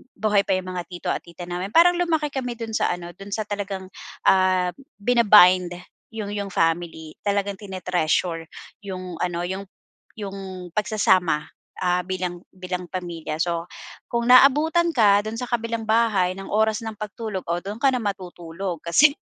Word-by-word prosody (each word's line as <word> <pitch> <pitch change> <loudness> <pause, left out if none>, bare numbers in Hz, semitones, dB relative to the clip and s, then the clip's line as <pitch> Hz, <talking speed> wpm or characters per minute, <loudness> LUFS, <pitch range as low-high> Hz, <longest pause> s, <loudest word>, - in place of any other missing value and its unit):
buhay 205 -1 +2
pa 195 - +1
iyong 185 0 -2
mga 180 -1 -4
tito 175 -1 -6
at - - 0
tita 170 +1 -10
namin 180 +5 -4
parang 350 +1 +6
lumaki 320 -4 +1
kami 255 -3 -3
doon 230 -1 -6
sa - - +1
ano 175 -1 -7
doon 200 0 -8
sa, 220 - -1
talagang, 195 -2 -4 0.4
ah, 185 -1 +3 0.3
bina-bind 200 -6 +6 0.4
iyong 215 -2 -4
iyong 200 -2 -4
family 165 -1 -1
talagang 200 -1 0
tine-treasure 180 -4 -1 0.4
iyong 185 -3 -6
ano, 175 0 -2
iyong 190 +3 -4 0.5
iyong 195 -3 -7
pagsasama, 190 -7 +2 0.4
ah, 180 -1 +1
bilang 180 -1 -3 0.2
bilang 180 -1 -5
pamilya. 170 -4 -5
So, 170 0 -1 0.4
kung 235 +1 -1
naabutan 305 +6 +5
ka 205 -5 +4
doon 225 +2 -4
sa 250 - -4
kabilang 230 -1 -2
bahay 210 -5 +2
ng 195 - -7
oras 220 +1 +1
ng 220 - -4
pagtulog, 210 -1 -5
o 170 - +1
doon 210 +3 -6
ka 275 - +5
na 255 - 0
matutulog 180 -3 -4
kasi 280 - +5
195 Hz, 160 wpm, -23 LUFS, 180-220 Hz, 0.5 s, parang